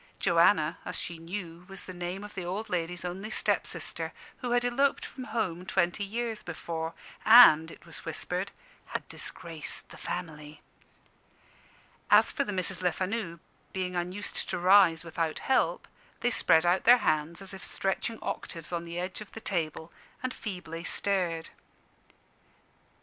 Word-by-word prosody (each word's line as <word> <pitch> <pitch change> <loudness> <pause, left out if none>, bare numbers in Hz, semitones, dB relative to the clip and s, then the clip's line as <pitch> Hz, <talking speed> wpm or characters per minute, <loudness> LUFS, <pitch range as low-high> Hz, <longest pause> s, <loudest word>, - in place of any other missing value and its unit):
Joanna, - - +4
as - - -5
she 170 -1 -4
knew, 170 0 -6
was 195 0 -8
the 185 - -8
name 180 +2 -4
of 210 - -8
the 185 - -4
old 200 +5 -4
ladies' 175 0 -2
only 190 +4 -4
step - - +1
sister, - - -3 0.2
who 250 - -4
had 245 0 +2
eloped 270 +3 +2
from 255 - -8
home 180 -8 -2
twenty 185 +1 +1
years 225 +2 -3
before, 165 -1 -4 0.3
and 190 -9 +9
(it - - -13
was 170 -2 -9
whispered) 180 +4 -2 0.5
had - - -16
disgraced 165 -3 -5
the - - -12
family. 155 -4 -6 1.5
As - - +6
for - - 0
the 210 - -4
Misses 185 -2 -1
Lefanu, 185 0 -1 0.3
being 185 -1 -2
unused 180 +4 -2
to - - -1
rise 180 -2 +6
without 165 -1 -2
help, 265 - +1 0.3
they 245 - +2
spread 165 -6 +4
out 175 +2 +3
their 245 +2 +9
hands 155 +2 +1
as 195 0 -7
if 195 - -9
stretching 195 +4 -1
octaves 165 -1 -5
on 170 -1 -2
the 170 0 -6
edge 185 +3 -3
of 210 - -10
the - - -6
table, 165 -5 -2 0.3
and 255 0 -1
feebly 180 -5 -6
stared. 175 -6 -1
180 Hz, 155 wpm, -29 LUFS, 170-205 Hz, 1.5 s, and